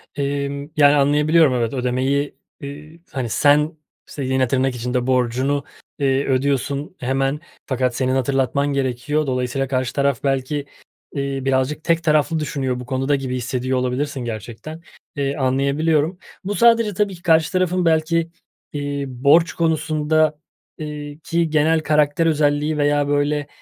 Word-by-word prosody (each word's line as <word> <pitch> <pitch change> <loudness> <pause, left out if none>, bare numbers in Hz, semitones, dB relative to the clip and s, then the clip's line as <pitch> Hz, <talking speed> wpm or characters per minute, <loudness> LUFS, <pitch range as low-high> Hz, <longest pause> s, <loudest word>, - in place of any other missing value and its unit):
Emm, 140 0 -3
yani, 145 -1 +6
anlayabiliyorum. 150 +1 +4
Evet, 120 -1 -1
ödemeyi, 130 +3 -1 0.3
iii, 150 +4 -9
hani, 130 -4 -3
sen 150 +6 +3 0.3
s 140 - -6
yine 130 0 +1
tırnak 130 0 0
içinde 125 +1 -2
borcunu, 130 +3 +1 0.4
eee, 135 0 +1
ödüyorsun 140 +4 -1
hemen 135 +3 0 0.3
fakat 130 -2 -1
senin 130 0 0
hatırlatman 135 +1 +1
gerekiyor. 140 +3 -1
Dolayısıyla 125 +1 -1
karşı 130 -1 -1
taraf 140 -1 0
belki, 135 +1 -1 0.5
iii, 140 -1 -3
birazcık 135 +3 0
tek 170 -1 +1
taraflı 155 +1 +2
düşünüyor 135 -4 -2
bu 125 - -7
konuda 135 +3 0
gibi 130 -2 -3
hissediyor 130 +1 -2
olabilirsin 130 +3 -2
gerçekten, 120 +8 -7 0.3
iii, 140 0 -1
anlayabiliyorum. 145 +5 +1 0.3
Bu 205 +2 -3
sadece 230 -2 +4
tabii 200 0 0
ki, 170 - -16
karşı 160 -2 +3
tarafın 185 -1 +1
belki, 165 +1 +2 0.4
iii, 145 -1 -3 0.2
borç 165 +4 +5
konusunda, 155 -1 +1 0.4
iii, 150 -1 -7
ki 165 +1 -1
genel 155 +1 +3
karakter 150 +1 +2
özelliği 150 -1 +1
veya, 145 0 +2
böyle, 145 0 0
145 Hz, 135 wpm, -21 LUFS, 130-155 Hz, 0.5 s, yani